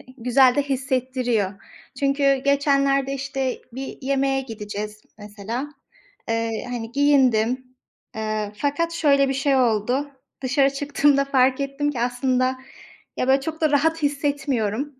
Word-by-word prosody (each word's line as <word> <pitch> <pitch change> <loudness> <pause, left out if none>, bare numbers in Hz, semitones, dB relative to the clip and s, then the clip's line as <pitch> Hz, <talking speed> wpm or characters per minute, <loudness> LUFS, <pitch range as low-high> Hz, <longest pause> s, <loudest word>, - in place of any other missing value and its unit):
ı - - -16
güzel 250 +1 +4
de 285 - +2
hissettiriyor. 255 -6 -1 0.5
Çünkü 275 0 +2
geçenlerde 275 -1 +2
işte 270 -1 -3
bir 265 +2 -7
yemeğe 270 0 +1
gideceğiz, 210 -3 -7 0.2
mesela. 210 +6 -5 0.6
Eee, 225 -1 -1
hani, 235 -1 -5
giyindim. 255 -3 +2 0.5
Eee, 215 -1 -3
fakat 295 +6 -1
şöyle 280 -4 +3
bir 270 - -1
şey 275 0 +1
oldu. 250 +4 +1 0.3
Dışarı 270 +2 +2
çıktığımda 280 0 +2
fark 265 -1 +2
ettim 280 +1 -1
ki, 250 - -4
aslında 255 +1 0 0.6
ya, 255 - -1
böyle 270 +1 +4
çok 320 +3 -5
da 310 -2 +2
rahat 320 +3 +1
hissetmiyorum, 280 -3 -1
270 Hz, 130 wpm, -23 LUFS, 245-280 Hz, 0.6 s, güzel